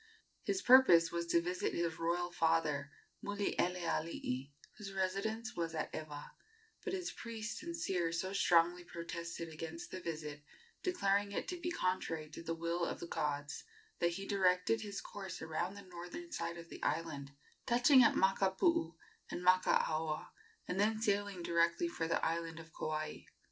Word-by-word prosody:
His 380 Hz, -1 st, -1 dB
purpose 210 Hz, -11 st, +8 dB
was 170 Hz, 0 st, -2 dB
to 170 Hz, 0 st, +3 dB
visit 180 Hz, +1 st, -1 dB
his 170 Hz, -1 st, -1 dB
royal 175 Hz, +1 st, 0 dB
father, 160 Hz, -4 st, +1 dB, 0.3 s
Mulielealii, 170 Hz, -9 st, -1 dB, 0.3 s
whose 200 Hz, -2 st, -7 dB
residence 200 Hz, +4 st, -1 dB
was 165 Hz, -1 st, -2 dB
at 155 Hz, -, -3 dB
Ewa; 150 Hz, -2 st, -6 dB, 0.5 s
but 390 Hz, -, -3 dB
his 365 Hz, -2 st, -2 dB
priest 230 Hz, -1 st, -5 dB
and 340 Hz, 0 st, -5 dB
seer 180 Hz, -, 0 dB
so 185 Hz, +3 st, -2 dB
strongly 175 Hz, -2 st, +4 dB
protested 170 Hz, -1 st, -5 dB
against 165 Hz, -, -7 dB
the 185 Hz, -, -4 dB
visit, 155 Hz, -4 st, -5 dB, 0.4 s
declaring 200 Hz, -, +1 dB
it -, -, -2 dB
to 360 Hz, -, -2 dB
be 345 Hz, -, -2 dB
contrary 175 Hz, -, -1 dB
to -, -, -7 dB
the 165 Hz, 0 st, -3 dB
will 170 Hz, +1 st, -1 dB
of -, -, -2 dB
the -, -, -5 dB
gods, 145 Hz, -3 st, -2 dB, 0.4 s
that 170 Hz, 0 st, +2 dB
he 195 Hz, +3 st, -5 dB
directed 190 Hz, +2 st, +3 dB
his 205 Hz, -2 st, -5 dB
course 195 Hz, -2 st, -7 dB
around 160 Hz, +4 st, -2 dB
the 200 Hz, -, -9 dB
northern 180 Hz, -, -8 dB
side 170 Hz, -, -3 dB
of 165 Hz, 0 st, -10 dB
the -, -, -9 dB
island, 145 Hz, -2 st, -2 dB, 0.3 s
touching 255 Hz, +3 st, +7 dB
at 235 Hz, -, +6 dB
Makapuu 190 Hz, -, +3 dB, 0.3 s
and 180 Hz, -, -4 dB
Makaaoa, 160 Hz, -4 st, +3 dB, 0.4 s
and 180 Hz, -, -2 dB
then 215 Hz, +2 st, +3 dB
sailing 205 Hz, -4 st, 0 dB
directly 170 Hz, 0 st, +2 dB
for 165 Hz, -1 st, -2 dB
the 165 Hz, -, +1 dB
island 165 Hz, 0 st, -1 dB
of 165 Hz, 0 st, -12 dB
Kauai. 155 Hz, 0 st, -3 dB
175 Hz, 160 wpm, -36 LUFS, 165-200 Hz, 0.5 s, purpose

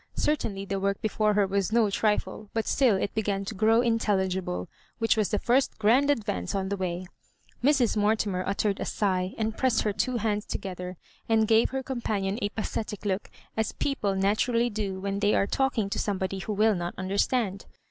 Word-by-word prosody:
Cer 300 Hz, -, +2 dB
tainly 195 Hz, -8 st, -5 dB
the 195 Hz, +1 st, -1 dB
work 200 Hz, 0 st, 0 dB
before 215 Hz, -1 st, +1 dB
her 205 Hz, -1 st, +4 dB
was 195 Hz, 0 st, 0 dB
no 220 Hz, -3 st, +3 dB
trifle; 210 Hz, 0 st, -1 dB
but 225 Hz, -, 0 dB
still 255 Hz, -7 st, +3 dB
it 190 Hz, -, -2 dB
began 200 Hz, -2 st, -1 dB
to 205 Hz, -, -4 dB
grow 220 Hz, +3 st, +4 dB
intelligible, 190 Hz, -, 0 dB, 0.3 s
which 225 Hz, -1 st, +2 dB
was 215 Hz, -3 st, +1 dB
the 210 Hz, -, +1 dB
first 255 Hz, +6 st, +1 dB
grand 240 Hz, +7 st, +4 dB
adyance 215 Hz, -7 st, -1 dB
on 190 Hz, -1 st, -1 dB
the 200 Hz, -, 0 dB
way. 185 Hz, -1 st, -3 dB, 0.6 s
Mrs. 270 Hz, -5 st, +3 dB
Mortimer 205 Hz, -3 st, +1 dB
uttered 200 Hz, 0 st, 0 dB
a -, -, -2 dB
sigh, 185 Hz, -2 st, -1 dB
and 220 Hz, 0 st, -1 dB
pressed 260 Hz, -2 st, +2 dB
her 210 Hz, -, 0 dB
two 250 Hz, +4 st, 0 dB
hands 210 Hz, -2 st, -1 dB
together, 180 Hz, -1 st, -5 dB, 0.3 s
and 220 Hz, -1 st, +3 dB
gave 225 Hz, +1 st, +4 dB
her 265 Hz, 0 st, -3 dB
companion 215 Hz, -6 st, -2 dB
a 205 Hz, -, 0 dB
pathetic 215 Hz, -1 st, -4 dB
look, 195 Hz, 0 st, -1 dB, 0.3 s
as 220 Hz, 0 st, -1 dB
people 210 Hz, -9 st, -1 dB
naturally 230 Hz, +5 st, +2 dB
do 200 Hz, -3 st, -3 dB
when 200 Hz, +1 st, -2 dB
they 205 Hz, 0 st, +3 dB
are -, -, +3 dB
talking 250 Hz, -2 st, 0 dB
to -, -, -1 dB
somebody 190 Hz, -1 st, -2 dB
who 210 Hz, -, -3 dB
will 215 Hz, +2 st, +4 dB
not 175 Hz, -2 st, -3 dB
understand. 200 Hz, +2 st, 0 dB
210 Hz, 190 wpm, -27 LUFS, 195-225 Hz, 0.6 s, her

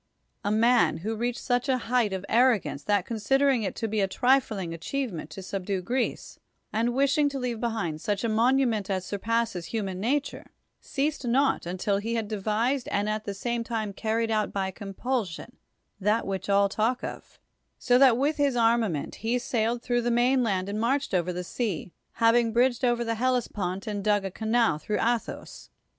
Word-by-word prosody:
— -, -, -48 dB
a 205 Hz, -, 0 dB
man> 225 Hz, -6 st, +4 dB
who 225 Hz, +1 st, -1 dB
reached 240 Hz, +2 st, -2 dB
such 245 Hz, +1 st, 0 dB
a 260 Hz, -, +3 dB
height 240 Hz, -3 st, +1 dB
of 190 Hz, 0 st, -4 dB
arro 240 Hz, -1 st, +4 dB
gance, 140 Hz, -, -6 dB
that 205 Hz, -3 st, +1 dB
considering 260 Hz, +4 st, +2 dB
it 200 Hz, -, -3 dB
to 225 Hz, -, -2 dB
be 215 Hz, 0 st, -1 dB
a 195 Hz, -, +2 dB
trifling 215 Hz, -6 st, +1 dB
achieve 240 Hz, +8 st, -3 dB
ment 155 Hz, -2 st, -6 dB
to 170 Hz, +5 st, -8 dB
subdue 195 Hz, 0 st, -3 dB
Greece, 245 Hz, +8 st, -3 dB, 0.3 s
and 230 Hz, +3 st, 0 dB
wishing 280 Hz, +2 st, +3 dB
to 275 Hz, -, -5 dB
leave 245 Hz, -3 st, -3 dB
be 240 Hz, -, +1 dB
hind 175 Hz, -9 st, -3 dB
such 205 Hz, 0 st, -1 dB
a -, -, +1 dB
monument 230 Hz, -2 st, +2 dB
as 185 Hz, -1 st, -1 dB
surpasses 220 Hz, -3 st, -1 dB
human 195 Hz, -5 st, -3 dB
na 245 Hz, +9 st, +2 dB
ture, 285 Hz, -, -7 dB, 0.3 s
ceased 285 Hz, -2 st, -2 dB
not 270 Hz, -5 st, +2 dB
until 185 Hz, +3 st, 0 dB
he 225 Hz, +3 st, -2 dB
had 225 Hz, -2 st, -1 dB
devised 220 Hz, +5 st, -1 dB
and 200 Hz, +1 st, 0 dB
at 215 Hz, 0 st, -2 dB
the 200 Hz, -, -4 dB
same 235 Hz, +3 st, -2 dB
time 220 Hz, -3 st, -3 dB
carried 225 Hz, +2 st, -1 dB
out 215 Hz, -1 st, 0 dB
by 190 Hz, -1 st, -2 dB
compulsion 205 Hz, +1 st, -4 dB, 0.4 s
that 210 Hz, +3 st, +1 dB
which 195 Hz, 0 st, -4 dB
all 200 Hz, 0 st, +4 dB
talk 220 Hz, +5 st, 0 dB
of, -, -, -7 dB, 0.4 s
so 245 Hz, 0 st, +3 dB
that 265 Hz, -4 st, +7 dB
wdth 285 Hz, +5 st, 0 dB
his 285 Hz, -3 st, +2 dB
armament 225 Hz, -9 st, +1 dB
he 230 Hz, +3 st, +1 dB
sailed 235 Hz, -1 st, -1 dB
through 240 Hz, -1 st, +1 dB
the 240 Hz, -, 0 dB
mainland 240 Hz, -6 st, +2 dB
and 205 Hz, +1 st, -3 dB
marched 270 Hz, +2 st, 0 dB
over 180 Hz, -1 st, +1 dB
the 180 Hz, 0 st, -4 dB
sea, 185 Hz, -4 st, -3 dB, 0.2 s
having 230 Hz, 0 st, +3 dB
bridged 245 Hz, +2 st, +2 dB
over 240 Hz, -1 st, +2 dB
the 230 Hz, -1 st, -2 dB
Ilellespont 210 Hz, -7 st, -1 dB
and 205 Hz, -2 st, -3 dB
dug 205 Hz, -1 st, +2 dB
a 195 Hz, -, -3 dB
canal 220 Hz, -5 st, +1 dB
through 210 Hz, +7 st, -2 dB
Ath 235 Hz, 0 st, +1 dB
os. -, -, -10 dB
225 Hz, 195 wpm, -27 LUFS, 200-245 Hz, 0.4 s, that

